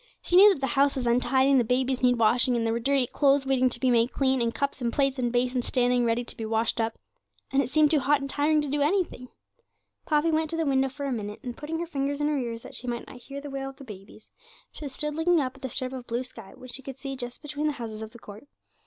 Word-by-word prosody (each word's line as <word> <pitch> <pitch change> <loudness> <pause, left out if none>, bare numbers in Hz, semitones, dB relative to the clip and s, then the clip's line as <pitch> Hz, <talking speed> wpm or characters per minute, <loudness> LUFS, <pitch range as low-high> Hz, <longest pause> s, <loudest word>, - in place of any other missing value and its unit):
She 355 - -1
knew 405 +3 +9
that 275 - -10
the - - +1
house 280 0 +2
was 260 -2 -2
untidy, 255 +3 +3
and 270 - +5
the - - +3
babies 255 +2 0
needed 245 -1 +3
washing, 245 +3 +3
and 230 -1 0
there 225 - +1
were 230 - -1
dirty 270 +1 +2
clothes 275 +2 +2
waiting 260 -1 +2
to 240 - -6
be 255 -1 +2
made 235 +1 +3
clean, 265 -2 +1
and 230 0 +1
cups 280 +1 -3
and 235 -1 0
plates 275 0 0
and 240 -1 0
basins 245 0 0
standing 245 -1 +2
ready 230 +1 +1
to - - -5
be 225 - -6
washed 225 +1 0
up. 225 0 -2 0.5
And 270 - +3
it 255 - -3
seemed 305 +1 +4
too 310 - +4
hot 280 +2 +2
and 275 - -4
tiring 295 +2 +1
to - - -3
do 290 +1 -1
anything. 305 -5 0 0.8
Poppy 305 +1 +2
went 315 0 0
to 330 - -2
the 325 - 0
window 270 -1 +2
for 280 +2 -6
a 275 - -2
minute, 210 -3 -4
and 245 -1 -5
putting 315 +2 -5
her 340 - -3
fingers 285 -3 -2
in 295 - +1
her 300 - 0
ears 230 -2 -5
that - - -11
she 250 - -7
might 240 -1 -3
not - - -12
hear 275 +3 -8
the 285 -1 -8
wail 270 0 -4
of 270 - -12
the 275 - -11
babies, 210 -2 -13 0.4
she 295 - -7
stood 300 +3 -3
looking 325 +2 +2
up 260 -2 -2
at - - -19
the 260 - -4
strip 255 0 -2
of 255 -2 -7
blue 240 +2 -2
sky, 225 -6 -12
which 255 -1 -11
she 270 - 0
could 270 -1 -8
just - - -27 0.4
see - - -38
between 295 +1 -2
the 300 - 0
houses 225 -4 -7
of 220 - -6
the 235 - -14
court. 215 +3 -12
265 Hz, 285 wpm, -27 LUFS, 240-285 Hz, 0.8 s, knew